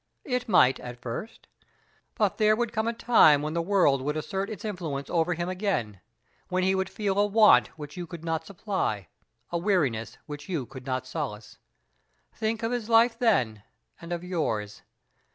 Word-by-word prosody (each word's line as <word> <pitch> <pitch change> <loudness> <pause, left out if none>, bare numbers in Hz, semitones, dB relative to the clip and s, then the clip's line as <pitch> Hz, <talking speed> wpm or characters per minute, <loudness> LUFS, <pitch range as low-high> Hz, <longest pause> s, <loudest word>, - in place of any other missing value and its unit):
It 250 -2 -2
might, 135 -9 +5
at 125 -1 -8
first; 125 - -7 0.7
but - - 0
there 215 0 +5
would 235 0 -2
come 220 0 0
a - - +2
time 190 -11 +5
when 155 +1 -3
the 170 - 0
world 165 -7 +3
would 150 +3 -2
assert 195 +5 -3
its 215 +1 -7
influence 160 -9 -4
over 175 +1 +1
him 175 +1 -3
again; 180 - -2 0.5
when 185 0 0
he 190 +1 +3
would 190 0 -1
feel 200 -2 -1
a 205 - +5
want 215 +1 +6
which 150 -1 -8
you 175 -1 -5
could 165 0 -9
not 165 -1 -1
supply 170 - -3 0.4
a 170 - 0
weariness 155 - 0
which 145 +1 -8
you 160 -8 -2
could 130 +1 -11
not 130 -1 -2
solace. 130 -7 -6 0.7
Think 220 +1 -2
of 225 - 0
his 240 -2 -3
life 230 +1 +4
then, 125 - +2 0.4
and 170 +1 -9
of 175 0 -3
yours. 115 - -2
175 Hz, 180 wpm, -27 LUFS, 140-210 Hz, 0.7 s, want